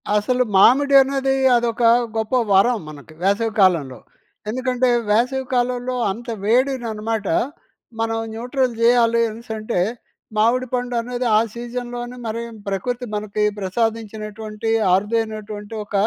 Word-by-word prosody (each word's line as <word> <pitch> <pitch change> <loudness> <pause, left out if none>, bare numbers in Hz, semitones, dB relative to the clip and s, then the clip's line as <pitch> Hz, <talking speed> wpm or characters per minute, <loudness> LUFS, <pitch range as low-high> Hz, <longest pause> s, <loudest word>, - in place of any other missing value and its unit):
అసలు 250 +5 +2
మామిడి 275 +8 +5
అనేది, 270 0 0 0.2
అదొక 235 0 0 0.3
గొప్పవరం 220 0 +2
మనకి 150 +1 -12
వేసవి 205 +4 +1
కాలంలో. 160 - +2 0.5
ఎందుకంటే, 255 +1 0 0.2
వేసవి 250 +5 +1
కాలంలో 250 0 0 0.2
అంత 235 +5 -8 0.2
వేడిననమాట, 225 -3 0 0.7
మనం 225 0 0 0.2
న్యూట్రల్ 250 +2 -1
జేయాలి 235 -1 +4
అనేసనంటే, 220 -2 -4 0.6
మామిడి 240 +4 +2
పండనేది 245 0 -2
ఆ - - +6
సీజన్‍లోనే 240 +1 -6
మరి 230 +1 -3 0.2
ప్రకృతి 245 +6 -3
మనకి 210 0 -1
ప్రసాదించినటువంటి, 215 +1 -3 0.2
అరుదైనటువంటి 215 0 -3
ఒక 210 - -16
230 Hz, 100 wpm, -21 LUFS, 215-245 Hz, 0.7 s, ఆ